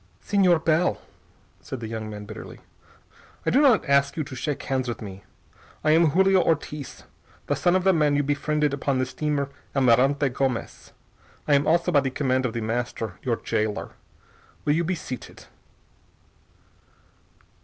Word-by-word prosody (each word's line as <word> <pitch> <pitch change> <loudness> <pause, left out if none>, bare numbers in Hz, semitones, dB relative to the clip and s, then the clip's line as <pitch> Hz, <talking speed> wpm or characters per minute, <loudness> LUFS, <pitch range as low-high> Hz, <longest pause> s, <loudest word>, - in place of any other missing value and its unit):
"Señor 180 -5 +3
Bell," 165 +2 +2 0.6
said 130 - -7
the 115 - -5
young 110 -1 -5
man 105 -1 -7
bitterly, 110 +1 -9 0.9
"I - - +2
do 270 - +4
not 255 - +4
ask 140 +1 +2
you 155 - 0
to 140 -2 -9
shake 145 +3 -3
hands 130 -1 -1
with 120 - -4
me. 100 -2 -9 0.6
I 155 - +3
am 165 +1 +5
Julio 190 +3 +4
Ortiz, 150 -3 -2 0.4
the - - 0
son 175 0 +2
of 185 - +2
the 190 0 +4
man 150 -3 +2
you 145 - +2
befriended 150 +1 0
upon 140 -1 -1
the 130 - +1
steamer 140 +1 -2 0.3
Almirante 135 +2 +3
Gomez. 130 -1 -3 0.6
I 150 - +3
am 140 +1 +3
also, 170 +2 +2
by 145 - +5
the 135 -1 -1
command 130 -1 0
of 115 - -6
The 115 - -3
Master, 115 -3 -3
your 120 -3 0
jailer. 110 -1 -2 0.7
Will 145 - +3
you 165 +3 +1
be 185 +2 -1
seated?" 130 -6 -8
140 Hz, 165 wpm, -25 LUFS, 125-160 Hz, 0.9 s, am